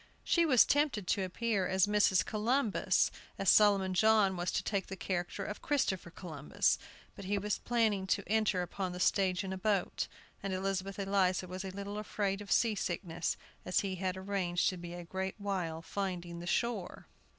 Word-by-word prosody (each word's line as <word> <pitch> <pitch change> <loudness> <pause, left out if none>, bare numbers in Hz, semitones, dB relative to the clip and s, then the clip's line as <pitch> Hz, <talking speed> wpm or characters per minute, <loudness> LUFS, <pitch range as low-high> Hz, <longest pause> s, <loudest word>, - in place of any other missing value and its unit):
She 340 -1 +3
was 255 -6 +6
tempted 285 -9 +1
to 195 - +1
appear 195 0 -1
as 190 -1 +3
Mrs. 205 -3 +3
Columbus, 225 +1 +1 0.3
as 195 - +4
Solomon 200 -3 +5
John 210 -1 +4
was 175 0 -1
to - - 0
take 200 -3 -1
the 195 - -5
character 175 -2 -3
of 210 - -6
Christopher 255 - 0
Columbus; 155 -5 -1 0.4
but 200 - -9
he 205 +2 0
was 205 +1 -1
planning 220 -5 +1
to 200 - +1
enter 215 -4 +1
upon 185 +1 -4
the 180 - -6
stage 185 +1 +2
in 190 -1 -4
a 190 - -5
boat, 200 -1 0 0.3
and 195 -1 -3
Elizabeth 195 +1 -2
Eliza 195 -2 +1
was 185 +1 -5
a 190 - -4
little 200 +2 -5
afraid 200 -1 -2
of 200 - -9
sea 230 -2 +4
sickness, 175 -3 -2 0.3
as 180 - +1
he 195 -2 -2
had 185 0 -2
arranged 190 -2 0
to 185 - -5
be 175 0 -7
a 175 - -7
great 190 +2 -4
while 180 -6 -3
finding 175 -3 -4
the 175 - -7
shore. 205 -3 -1
195 Hz, 185 wpm, -33 LUFS, 180-205 Hz, 0.4 s, was